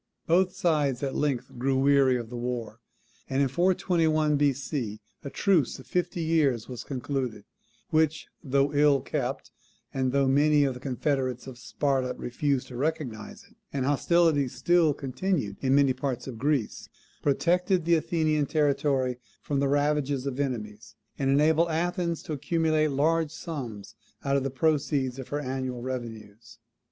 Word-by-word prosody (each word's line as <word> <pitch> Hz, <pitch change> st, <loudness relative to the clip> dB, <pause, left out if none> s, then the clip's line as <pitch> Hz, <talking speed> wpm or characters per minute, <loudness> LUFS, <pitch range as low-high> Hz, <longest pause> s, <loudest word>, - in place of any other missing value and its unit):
Both 180 Hz, +2 st, +2 dB
sides 145 Hz, -6 st, +1 dB
at 135 Hz, -, -1 dB
length 130 Hz, -4 st, -2 dB
grew 135 Hz, +1 st, +1 dB
weary 135 Hz, -1 st, +4 dB
of 115 Hz, -1 st, -7 dB
the -, -, -6 dB
war; 120 Hz, -2 st, -4 dB, 0.5 s
and 135 Hz, 0 st, 0 dB
in 140 Hz, -, +3 dB
421 160 Hz, -1 st, +2 dB
B.C. 135 Hz, -6 st, -1 dB, 0.2 s
a 140 Hz, -, -5 dB
truce 165 Hz, -, +1 dB
of 130 Hz, -, -13 dB
fifty 175 Hz, -1 st, -1 dB
years 150 Hz, -8 st, +1 dB
was 125 Hz, -2 st, -7 dB
concluded, 130 Hz, -5 st, -4 dB, 0.5 s
which, 160 Hz, -1 st, +2 dB, 0.2 s
though 140 Hz, 0 st, +1 dB
ill 145 Hz, -2 st, +4 dB
kept, 135 Hz, -2 st, -3 dB, 0.4 s
and 130 Hz, -1 st, 0 dB
though 140 Hz, 0 st, +2 dB
many 145 Hz, +2 st, +4 dB
of 135 Hz, -2 st, +1 dB
the 125 Hz, -, -9 dB
confederates 130 Hz, -1 st, -2 dB
of 130 Hz, -2 st, -10 dB
Sparta 130 Hz, -1 st, -1 dB
refused 135 Hz, +2 st, -1 dB
to 125 Hz, -, -9 dB
recognise 140 Hz, -7 st, -3 dB
it, -, -, -23 dB, 0.2 s
and 135 Hz, -2 st, -1 dB
hostilities 145 Hz, -2 st, +2 dB
still 160 Hz, +3 st, +3 dB
continued 135 Hz, -, -2 dB
in 135 Hz, 0 st, +2 dB
many 140 Hz, -2 st, +4 dB
parts 130 Hz, -2 st, -3 dB
of 120 Hz, -4 st, -7 dB
Greece, 140 Hz, -4 st, -1 dB, 0.3 s
protected 175 Hz, +4 st, +1 dB
the 170 Hz, -, +3 dB
Athenian 155 Hz, -2 st, +1 dB
territory 140 Hz, -4 st, +1 dB, 0.2 s
from 140 Hz, -2 st, -1 dB
the 140 Hz, 0 st, +1 dB
ravages 145 Hz, -2 st, +1 dB
of 135 Hz, -1 st, -3 dB
enemies, 110 Hz, -6 st, -4 dB, 0.2 s
and 135 Hz, -1 st, +1 dB
enabled 155 Hz, +4 st, +3 dB
Athens 170 Hz, +1 st, -1 dB
to 155 Hz, -, -5 dB
accumulate 155 Hz, +1 st, +1 dB
large 155 Hz, +3 st, +1 dB
sums 135 Hz, -, -7 dB, 0.3 s
out 140 Hz, 0 st, +2 dB
of 140 Hz, -, +2 dB
the 135 Hz, -, -2 dB
proceeds 135 Hz, -2 st, 0 dB
of 130 Hz, -, -7 dB
her 145 Hz, -, -2 dB
annual 130 Hz, -3 st, -4 dB
revenues. 115 Hz, -4 st, -7 dB
140 Hz, 155 wpm, -27 LUFS, 130-155 Hz, 0.5 s, weary